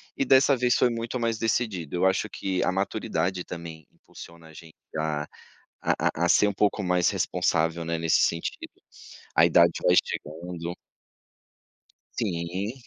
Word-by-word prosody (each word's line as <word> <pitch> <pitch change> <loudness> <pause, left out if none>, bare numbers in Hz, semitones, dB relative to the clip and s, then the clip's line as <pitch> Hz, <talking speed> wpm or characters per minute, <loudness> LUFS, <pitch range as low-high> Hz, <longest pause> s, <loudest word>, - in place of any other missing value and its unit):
E - - 0
dessa 135 +1 +5
vez 125 -1 +2
foi 125 - +3
muito 115 +2 -4
mais 115 -2 -1
decidido. 105 -8 -1
Eu 90 - +2
acho 95 - +1
que 95 -1 -2
a 90 - +1
maturidade, 95 -2 -2
também, 80 -3 -9
impulsiona 85 -1 -14
a 80 - -15
gente 80 0 -14 0.2
a 75 -1 -1 0.6
a - - +1 0.3
a - - +4
a 85 - +1
ser 105 - +5
um 100 - -3
pouco 105 +1 +1
mais 90 -1 +2
responsável, 80 +1 0
né, 85 0 -2
nesse 80 0 +2
sentido. 85 0 -2 0.7
A 80 - +6
idade 85 0 +5
vai 90 - +5
chegando. 85 +2 -2 1.4
Sim. 95 +1 -2
90 Hz, 155 wpm, -26 LUFS, 85-105 Hz, 1.4 s, A